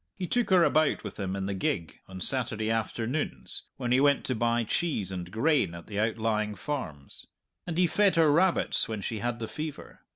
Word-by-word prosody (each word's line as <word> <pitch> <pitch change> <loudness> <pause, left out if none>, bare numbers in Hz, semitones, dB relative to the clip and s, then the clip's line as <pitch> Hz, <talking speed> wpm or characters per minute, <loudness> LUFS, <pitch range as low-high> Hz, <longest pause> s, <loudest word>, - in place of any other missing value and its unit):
He 180 - -3
took 245 +6 0
her 185 -3 +6
about 155 -2 +2
with 105 -1 -7
him 95 -1 -2
in 95 -1 -3
the 100 - -2
gig, 90 -3 -2
on 95 -1 -9
Saturday 110 -2 +1
afternoons, 115 - -3
when 125 -2 -2
he 130 - +5
went 140 0 +3
to 130 - 0
buy 120 0 +1
cheese 115 - -1
and 90 -2 -5
grain 120 - +1
at 85 - -9
the 100 -1 -4
outlying 110 -1 0
farms. 90 - -5 0.4
And 170 -2 -3
he 180 - +5
fed 200 +3 +3
her 160 -3 +5
rabbits 175 -3 +2
when 110 -2 -3
she 110 +2 -3
had 120 +1 -2
the 115 -1 -4
fever. 155 +2 -7
115 Hz, 200 wpm, -28 LUFS, 100-150 Hz, 0.4 s, her